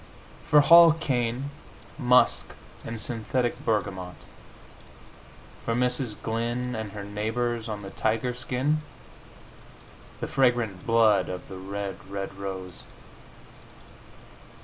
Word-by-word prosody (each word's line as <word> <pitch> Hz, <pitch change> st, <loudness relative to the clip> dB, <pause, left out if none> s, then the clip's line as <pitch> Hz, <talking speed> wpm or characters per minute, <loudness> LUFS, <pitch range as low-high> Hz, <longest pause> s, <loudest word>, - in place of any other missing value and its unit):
For 150 Hz, -, +7 dB
Hall 165 Hz, +2 st, +8 dB
Caine, 130 Hz, -3 st, -1 dB, 0.5 s
musk 125 Hz, -2 st, +3 dB, 0.3 s
and 115 Hz, 0 st, -5 dB
synthetic 120 Hz, +2 st, -2 dB
bergamot. 95 Hz, -4 st, -2 dB, 1.5 s
For 115 Hz, -, -1 dB
Mrs. 125 Hz, -2 st, 0 dB
Glyn 120 Hz, +2 st, -2 dB
and 110 Hz, -3 st, -5 dB
her 105 Hz, -1 st, -6 dB
neighbors 110 Hz, +3 st, -2 dB
on 105 Hz, -1 st, -5 dB
the 95 Hz, -, -8 dB
tiger 115 Hz, +3 st, 0 dB
skin, 135 Hz, +5 st, -1 dB, 1.4 s
the -, -, -3 dB
fragrant 120 Hz, -8 st, +1 dB
blood 110 Hz, -5 st, +4 dB
of 90 Hz, 0 st, -6 dB
the 95 Hz, -, -7 dB
red, 100 Hz, +1 st, -5 dB
red 100 Hz, 0 st, -5 dB
rose. 95 Hz, -2 st, -6 dB
115 Hz, 100 wpm, -26 LUFS, 100-125 Hz, 1.5 s, Hall